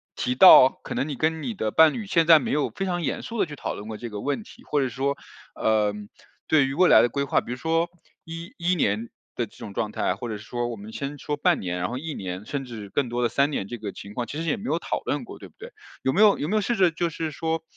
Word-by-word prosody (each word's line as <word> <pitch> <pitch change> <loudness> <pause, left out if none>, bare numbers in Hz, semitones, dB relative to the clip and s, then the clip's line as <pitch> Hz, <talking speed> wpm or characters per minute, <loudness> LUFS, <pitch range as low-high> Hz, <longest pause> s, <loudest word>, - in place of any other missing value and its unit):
提 125 +2 -1
到 130 -3 +9
可 - - -5
能 140 - -1
你 145 - -3
跟 160 +3 0
你 235 - -3
的 110 - -2
伴 160 +4 +6
侣 220 -4 -5
现 170 -4 +2
在 165 -2 +9
没 - - -3
有 150 0 +1
非 195 - -4
常 175 -2 -1
严 140 - -2
肃 230 -2 -5
地 - - +3
去 150 -3 -9
讨 - - -3
论 105 - -8
过 110 - -5
这 120 - -6
个 105 -1 -6
问 145 +10 -2
题， 240 +3 -16
或 145 - 0
者 130 - 0
说， 140 +2 -2 0.4
呃， 110 -1 +2 0.6
对 145 -4 +4
于 135 - -3
未 180 +3 +5
来 - - +7
的 120 - +2
规 140 +3 -1
划， 140 - +1
比 - - -8
如 125 - -4
说 165 +4 0 0.4
一 165 +1 -8
一 180 +1 +1
年 110 - 0 0.3
的 - - -2
这 - - -20
种 100 - -8
状 105 +1 -2
态， 90 - 0
或 115 +4 -6
者 105 - -4
说 120 +3 -4
我 120 - -4
们 105 +1 -11
先 140 +1 -5
说 150 - -3
半 145 - +2
年， 90 -1 -3
然 90 - -2
后 125 - -4
1 155 +3 -5
年 95 -1 -6
甚 140 +3 -4
至 115 -5 -8
更 130 +3 -1
多 120 +1 -1
的 120 - +2
3 140 +1 +2
年 100 -9 -3
这 120 - -6
个 105 -2 -5
情 100 +1 -10
况 120 +1 -3
其 145 - -6
实 165 - -2
也 245 - +1
没 210 - -9
有 - - 0
讨 - - -3
论 - - -2
过 - - -11
对 - - -11
不 - - -33
对？ 470 +3 -10 0.3
有 130 - +1
没 200 - +3
有 210 -2 +6
有 150 - -3
没 210 - 0
有 215 - +3
试 240 +4 0
着 185 -5 +4
就 170 +1 -1
是 160 -1 -4
说 160 +1 -2
140 Hz, 315 characters per minute, -25 LUFS, 115-165 Hz, 0.6 s, 到